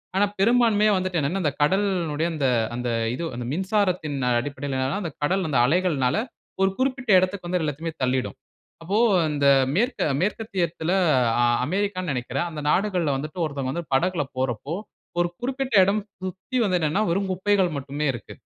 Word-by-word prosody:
ஆனா, 200 - +4
பெரும்பான்மையா 220 -1 +4
வந்துட்டு 185 -2 -1
என்னனா, 165 +7 -1
இந்த 145 -3 +1
கடல்னுடைய 170 -3 +1
அந்த 145 -4 0 0.3
அந்த 120 0 -2 0.3
இது 170 - -4
அந்த 120 0 -5
மின்சாரத்தின் 185 -5 0 0.2
அடிப்படையில 140 0 -4
ஏனா, 175 +9 -2
அந்த 165 - -4
கடல் 185 +3 +1
அந்த 135 - +2
அலைகள்னால 150 -4 +1 0.5
1 190 - +4
குறிப்பிட்ட 260 -2 -1
எடத்துக்கு 185 0 -2
வந்து 180 0 0
எல்லாத்தையுமே 155 +2 -3
தள்ளிடும். 130 0 0 0.5
அப்போ 195 +5 -1 0.3
அந்த 145 -1 0 0.3
மேற்க 240 +8 0 0.2
மேற்கத்தியத்தில, 185 -5 -1 0.5
அ - - +4 0.2
அமெரிக்கான்னு 185 -1 -1
நினைக்கிறேன், 130 +5 -2
அந்த 155 -2 -6
நாடுகள்ல 180 -5 +1
வந்துட்டு 155 +5 -5
ஒருத்தவங்க 140 -3 -3
வந்து 170 0 -4
படகில 170 +2 +1
போறப்போ, 130 +3 -2 0.5
1 175 - +3
குறிப்பிட்ட 265 0 -3
இடம் 205 +2 +1 0.2
சுத்தி 190 +8 -4
வந்து 185 -2 +2
நின்னா, 170 +8 +1
வெறும் 195 +3 0
குப்பைகள் 190 0 +2
மட்டுமே 140 +2 -3
இருக்கு. 120 - -9
175 Hz, 155 wpm, -24 LUFS, 145-195 Hz, 0.5 s, ஆனா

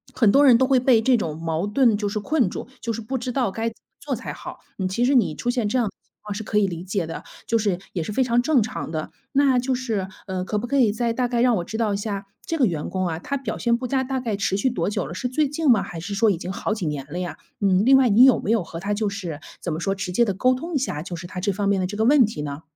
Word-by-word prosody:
很 215 -4 +4
多 285 +1 +5
人 250 -4 +7
都 260 - +3
会 260 -1 +4
被 245 -3 +4
这 255 0 +4
种 160 -8 -2
矛 165 +3 -2
盾 230 0 +3
就 205 -1 -2
是 210 - -2
困 260 - +1
住， - - -6
就 230 - -2
是 230 +1 -4
不 260 +4 -3
知 250 +1 -3
道 245 -6 0
该 225 +2 -2
怎 225 - -16
么 - - -33
做 - - -3
才 - - -6
好。 - - -9 0.2
嗯， 185 - 0
其 235 +6 0
实 275 - +3
你 225 - +3
出 245 - -1
现 235 -5 -1
这 255 - 0
样 240 - +2
的 - - -5
情 - - -43
况 210 - -5
是 220 +2 -5
可 210 - -1
以 205 - +4
理 170 -1 -5
解 190 -2 -2
的， 165 - -6 0.2
就 230 - +2
是， 200 -5 0 0.2
也 175 - -1
是 210 - -5
非 260 - +2
常 240 0 +2
正 270 -1 +3
常 245 -6 -5
的。 155 -1 -4 0.2
那 270 -2 +4
就 255 +1 0
是， 225 -7 -2 0.2
呃， 185 -1 -3
可 210 - -2
不 240 - -2
可 280 +2 0
以 230 -6 +4
再 235 +1 0
大 250 0 0
概 240 -1 0
让 245 -2 +4
我 175 - -2
知 220 - -5
道 215 -3 +1
一 - - 0
下， 200 -1 -4 0.2
这 330 - -2
个 265 - +4
员 160 -6 -2
工 185 -1 -1
啊， 160 -1 -3
他 280 +8 -3
表 240 -5 -4
现 235 -1 +1
不 255 - -5
佳 265 +1 +1
大 265 0 -2
概 225 -5 -2
持 200 -1 0
续 230 - +1
多 180 -6 -1
久 205 - -2
了？ - - -7
是 250 +7 -2
最 295 +4 +1
近 300 -1 0
吗？ 215 - +4
还 165 - -7
是 200 +4 -5
说 220 0 +4
已 175 - -1
经 180 +2 -5
好 210 - -2
几 205 -6 -4
年 140 -2 -3
了 175 - -3
呀？ 175 -4 -4 0.2
嗯， 195 -1 +3
另 270 +1 +7
外 260 -3 +4
你 230 +5 +7
有 260 -3 +5
没 - - -4
有 225 -6 +2
和 165 0 -8
他 200 +3 -2
就 210 -1 0
是 180 -7 -5 0.2
怎 175 - -3
么 160 - -3
说， 195 +2 0
直 190 -2 -4
接 235 +6 +3
地 200 - -1
沟 255 +6 +2
通 330 +6 -6
一 - - +4
下， 150 - -3
就 175 0 -6
是 175 +1 -7
他 180 - -6
这 200 +1 +1
方 200 +1 -1
面 195 -1 +2
的 - - 0
这 205 - -6
个 220 - +1
问 275 -1 +6
题 210 -8 -5
呢？ 145 0 -5
215 Hz, 350 characters per minute, -23 LUFS, 185-250 Hz, 0.2 s, 人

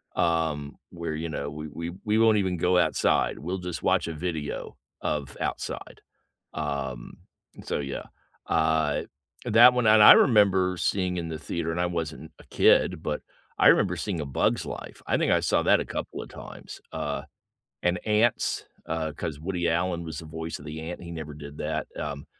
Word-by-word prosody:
um, 80 -4 0
where, 85 -3 -5
you 80 +2 -4
know, 70 -2 -3
we 75 +1 -7
we 85 +3 -5
we 105 +1 +2
won't 110 -1 +5
even 95 -3 0
go 90 +2 +2
outside, - - +2
we'll 90 +5 -3
just 90 -1 -5
watch - - +2
a 85 - -3
video 80 -2 -4 0.2
of 70 -3 -3
outside. - - -4 0.5
Um, 65 -4 -4 0.5
so, - - -2
yeah, 70 -1 -5 0.4
uh, 80 -2 +1 0.4
that 120 +1 +7
one, 125 -2 +1
and 110 0 +7
I 105 - +12
remember 95 -6 +4
seeing 95 -1 0
in 85 -1 -3
the 80 -1 -5
theater, 80 +1 -3
and 85 - -2
I 90 - +2
wasn't 80 -2 -4
a - - -15
kid, 90 -4 +4
but 75 - -2 0.4
I - - +6
remember 90 -3 +4
seeing 90 -1 -3
A 75 - -4
Bug's 65 - +1
Life. - - -8
I - - +2
think - - +1
I - - +4
saw - - +2
that - - +5
a - - -2
couple - - -5
of - - -9
times, - - -10
uh, 70 - -3 0.6
and 90 0 +1
Ants, 110 +2 +2 0.2
uh, 80 -1 -2
'cause 75 0 -5
Woody 85 0 -1
Allen 85 +1 0
was 80 -2 -6
the 80 - -7
voice 80 +1 -5
of 75 - -13
the 80 +1 -6
ant, 85 +3 -6
he 85 - -8
never 80 -2 -6
did 75 0 -10
that, 80 0 -2
um, 70 - -5
80 Hz, 190 wpm, -27 LUFS, 75-90 Hz, 0.6 s, I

